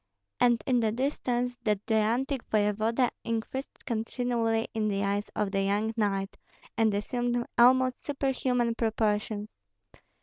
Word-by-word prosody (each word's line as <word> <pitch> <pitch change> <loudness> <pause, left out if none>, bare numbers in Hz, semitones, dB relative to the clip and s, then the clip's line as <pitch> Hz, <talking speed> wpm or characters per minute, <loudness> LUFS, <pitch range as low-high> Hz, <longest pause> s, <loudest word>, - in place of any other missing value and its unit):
And 240 -3 +3
in 250 -2 +3
the 220 -2 +1
distance 245 -1 -1
that 210 -2 0
gigantic 235 +5 +1
voevoda 220 +4 +2
increased 230 +4 -4
continually 230 -1 -1
in 220 -2 0
the 200 -1 0
eyes 200 +1 -1
of 210 -2 0
the 195 -1 +1
young 205 +3 0
knight, 195 -3 -1 0.4
and 225 -1 +3
assumed 240 +3 -1
almost 255 +1 +4
superhuman 255 -4 0
proportions. 215 -2 -1
225 Hz, 125 wpm, -28 LUFS, 210-245 Hz, 0.4 s, almost